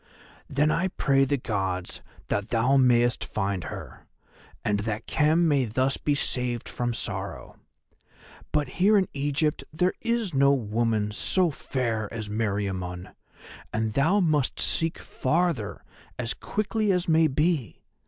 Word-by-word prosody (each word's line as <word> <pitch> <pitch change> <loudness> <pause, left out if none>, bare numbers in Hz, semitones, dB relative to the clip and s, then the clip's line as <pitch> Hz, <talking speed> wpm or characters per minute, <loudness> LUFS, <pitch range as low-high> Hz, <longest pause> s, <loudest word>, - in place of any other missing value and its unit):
"Then 150 +3 +2
I 175 +4 +1
pray 135 -6 +2
the 140 +1 0
Gods 95 -7 -3 0.3
that 100 +1 -1
thou 125 +4 +2
mayest 120 -2 +3
find 100 -3 -2
her, - - -9 0.6
and 105 -1 +1
that 110 +1 -3
Khem 160 +3 +3
may 140 -4 +3
thus 130 +5 0
be 145 - 0
saved 125 -4 -1
from 120 0 -2
sorrow. 100 -5 -4 0.9
But 150 -2 +1
here 210 +3 +6
in 190 -3 +2
Egypt 145 +2 0
there 180 +4 +1
is 230 -5 -1
no 140 +1 +5
woman 110 -3 0
so 175 - +1
fair 115 -6 -2
as 110 -2 -5
Meriamun, 95 -4 -3 0.6
and 110 0 -1
thou 165 - +3
must 155 -7 +1
seek 165 0 +2
farther 150 - -1 0.3
as 120 -1 -2
quickly 215 0 -1
as 180 -1 0
may 160 0 +4
be. 150 -2 -1
130 Hz, 135 wpm, -26 LUFS, 110-155 Hz, 0.9 s, here